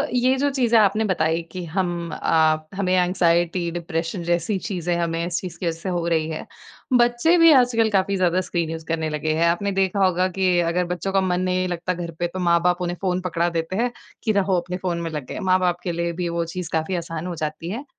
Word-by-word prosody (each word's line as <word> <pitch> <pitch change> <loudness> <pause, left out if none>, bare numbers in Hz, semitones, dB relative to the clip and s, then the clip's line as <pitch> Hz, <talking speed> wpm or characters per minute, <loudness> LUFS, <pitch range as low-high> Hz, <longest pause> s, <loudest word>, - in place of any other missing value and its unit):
ये 255 +2 +3
जो 285 +2 +1
चीज़ें 245 -4 +2
आपने 210 +1 +3
बताई 170 -4 +1
कि 185 -1 -5
हम 175 0 -2
आप 155 -1 +2
हमें 190 -2 0
एंग्जायटी, 175 -1 +2
डिप्रेशन 170 +1 -3
जैसी 175 +4 0
चीज़ें 180 -4 -2
हमें 170 0 -1
इस 175 0 -2
चीज़ 180 -3 -7
की 175 - -2
वजह 165 -1 -2
से 190 - -4
हो 175 -2 -1
रही 160 -2 +1
हैं। 155 - -5 0.5
बच्चे 240 +8 +3
भी 330 -1 +7
आजकल 245 -4 +4
काफ़ी 200 -1 +1
ज़्यादा 185 -1 +2
स्क्रीन 170 -3 -2
यूज़ 160 -1 -6
करने 160 -1 -1
लगे 155 +1 -1
हैं। 165 +1 +3
आपने 175 +4 0
देखा 195 0 +2
होगा 185 0 +2
कि 185 -2 +3
अगर 175 +1 +1
बच्चों 180 +2 -3
का 195 - +3
मन 180 -1 0
नहीं 185 0 0
लगता 180 +1 -2
घर 170 -1 -5
पे 175 - +1
तो 185 +2 -7
माँ 170 -1 +3
बाप 180 +1 +1
उन्हें 175 0 -2
फ़ोन 185 -1 0
पकड़ा 170 -1 0
देते 165 +2 -3
हैं, 240 +4 0 0.3
कि 220 - +2
रहो 200 -2 +2
अपने 180 +1 -5
फ़ोन 180 -2 -2
में 165 - -3
लगे। 150 -5 -5
माँ 185 -1 +2
बाप 175 -1 0
के 175 - -2
लिए 170 0 -1
भी 175 0 -3
वो 170 0 -1
चीज़ 170 0 -5
काफ़ी 160 +3 0
आसान 165 0 -4
हो 175 - -4
जाती 155 +1 -4
है। 235 +9 -5
175 Hz, 235 wpm, -23 LUFS, 170-190 Hz, 0.5 s, भी